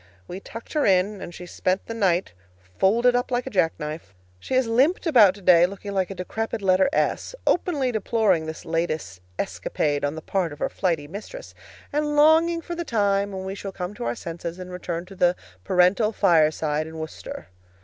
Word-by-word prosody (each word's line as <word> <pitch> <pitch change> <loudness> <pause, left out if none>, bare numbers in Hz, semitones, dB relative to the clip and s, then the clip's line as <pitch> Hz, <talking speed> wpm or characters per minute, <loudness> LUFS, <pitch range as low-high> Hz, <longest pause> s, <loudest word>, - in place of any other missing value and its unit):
We 180 - -6
tucked 230 +3 -10
her 300 -2 +1
in, 195 +1 +2
and - - -7
she 180 +1 -9
spent 185 +2 -1
the 230 - -5
night 190 - +1 0.5
folded 235 +6 +4
up 245 0 0
like 245 -1 -1
a - - -6
jackknife. 155 - -2 0.2
She 260 - -3
has 260 0 +3
limped 260 +12 +2
about 225 - +6
today, 180 -3 +5
looking 200 +1 -8
like 190 -2 0
a 195 - -6
decrepit 220 +4 -4
letter 190 +5 +4
S, 320 - -1
openly 290 -8 +1
deploring 210 -6 +1
this 160 +1 -7
latest 160 - -2 0.2
escapade 145 -1 -2
on 145 +1 -1
the 160 - -8
part 185 -5 -1
of - - -11
her - - -1
flighty 165 -6 -1
mistress, 220 - -9 0.4
and 295 0 0
longing 320 +3 +5
for 345 - -6
the 345 0 -3
time 200 -6 +1
when 190 -1 -5
we 190 - -4
shall 195 0 -6
come 180 +1 -5
to 120 - -6
our 120 +1 -1
senses, 170 +2 -6
and 185 0 -8
return 175 -1 -4
to 195 +1 -13
the 180 -1 +3 0.3
parental 185 - +3
fireside 155 -4 +2
in 160 0 -9
Worcester. 160 - -7
190 Hz, 190 wpm, -24 LUFS, 170-230 Hz, 0.5 s, about